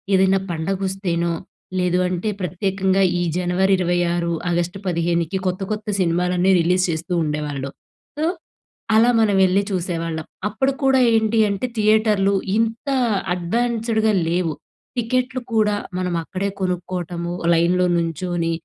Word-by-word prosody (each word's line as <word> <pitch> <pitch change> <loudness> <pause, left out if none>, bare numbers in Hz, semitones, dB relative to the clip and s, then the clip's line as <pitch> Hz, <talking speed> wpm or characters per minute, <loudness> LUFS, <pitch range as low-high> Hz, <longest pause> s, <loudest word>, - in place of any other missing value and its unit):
ఏదైనా 190 0 +4
పండగొస్తేనో 180 0 -1 0.5
లేదు 180 0 +1
అంటే 180 +4 -2
ప్రత్యేకంగా 190 +2 0 0.2
ఈ - - 0 0.2
జనవరి 180 +2 +1
ఇరవై 175 -1 +1 0.2
ఆరు, 170 -1 -1 0.2
ఆగస్టు 175 +2 -1
పదిహేనికి 170 +1 0
కొత్త 185 +1 -1
కొత్త 215 +1 -7
సినిమాలన్నీ 180 +1 +2
రిలీజ్ 180 +2 +2
చేస్తూ 170 +2 -3
ఉండేవాళ్ళు. 150 -2 -3 0.5
సో, 310 - 0 0.7
అలా 230 +2 +5
మనం 205 -3 +3
వెళ్లి 185 +2 +3
చూసేవాళ్ళం. 165 -3 -2 0.2
అప్పుడు 265 +6 0
కూడా 270 -1 +4
ఏంటీ 220 0 +2
అంటే 200 +5 -2
థియేటర్లు 215 -2 +3 0.2
ఇంత 225 +5 -1 0.5
అడ్వాన్స్‌డ్‌గా 220 +3 0 0.2
లేవు. 170 -2 0 0.4
టికెట్లు 255 +2 0
కూడా 210 -2 +3 0.2
మనం 180 -1 -1
అక్కడే 185 +4 -3
కొనుక్కోటము 180 -1 -3 0.2
లైన్‌లో 175 +2 +3
నుంచొని 170 0 -1
185 Hz, 120 wpm, -21 LUFS, 170-210 Hz, 0.7 s, అలా